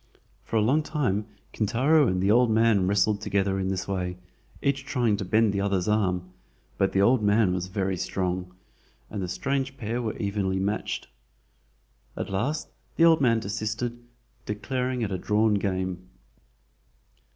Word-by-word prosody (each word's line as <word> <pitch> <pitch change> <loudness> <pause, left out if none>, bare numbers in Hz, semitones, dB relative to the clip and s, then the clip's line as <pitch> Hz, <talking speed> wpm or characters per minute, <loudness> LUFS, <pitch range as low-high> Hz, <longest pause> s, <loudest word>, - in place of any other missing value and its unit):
For - - -5
a 110 - +4
long 135 +8 +3
time 125 - -1 0.3
Kintaro 130 +8 +3
and 90 -2 0
the 100 - +3
old 120 +1 +5
man 110 -4 +3
wrestled 100 +1 +2
together 100 -2 0
in 95 - -1
this 95 -1 -2
way, 90 -2 -2 0.4
each 140 -1 0
trying 125 -7 +1
to 100 - -4
bend 110 +2 +3
the 100 - 0
other's 100 -3 0
arm, 90 -4 0 0.5
but 95 - +2
the 100 - +3
old 120 +2 +4
man 105 -2 +3
was 90 0 -2
very 95 0 -1
strong, 90 0 -2 0.6
and 105 - -4
the 90 - -2
strange 135 +7 -2
pair 115 +1 -3
were 110 -2 -3
evenly 100 -2 -1
matched. 100 +3 -2 1.1
At - - -4
last 135 +11 -1 0.3
the 165 - +5
old 160 -3 +5
man 115 -4 +4
desisted, 115 +3 -3 0.4
declaring 125 +4 -2
it 105 - -2
a 95 - -2
drawn 105 +2 +2
game. 95 -2 -2
105 Hz, 160 wpm, -26 LUFS, 95-120 Hz, 1.1 s, old